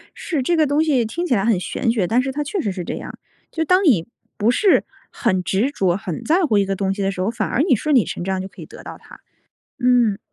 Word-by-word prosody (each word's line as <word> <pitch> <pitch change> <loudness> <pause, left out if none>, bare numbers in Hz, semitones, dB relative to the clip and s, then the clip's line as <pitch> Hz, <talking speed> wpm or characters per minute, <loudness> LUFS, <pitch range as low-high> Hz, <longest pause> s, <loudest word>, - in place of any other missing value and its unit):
是， 310 -6 -3
这 340 +7 +1
个 315 - +3
东 290 +3 +2
西 270 -7 +2
听 340 +11 -3
起 280 - +1
来 195 -1 0
很 220 -5 +2
玄 230 +5 -1
学， 215 -6 0
但 235 +5 +2
是 265 +1 -3
它 295 +2 -3
确 350 +5 -3
实 205 - -2
是 185 -1 -5
这 - - -4
样。 - - -8 0.3
就 325 - -1
当 365 +4 +3
你 220 - +3 0.3
不 215 +3 +2
是 390 +9 +3 0.3
很 185 -7 0
执 215 +11 0
着、 190 -9 0
很 180 -6 -6
在 345 +4 +2
乎 220 -10 +2
一 200 - +3
个 195 0 -2
东 195 0 -1
西 200 - -5
的 195 0 0
时 185 - -5
候， 190 - 0
反 240 - -3
而 265 - +1
你 310 -5 +3
顺 300 +6 0
理 240 - +4
成 - - -5
章 190 0 -2
就 190 - -6
可 - - -14
以 - - -8
得 - - -13
到 - - -9
它。 - - -16 0.6
嗯。 245 -5 +3
235 Hz, 295 characters per minute, -20 LUFS, 195-295 Hz, 0.6 s, 理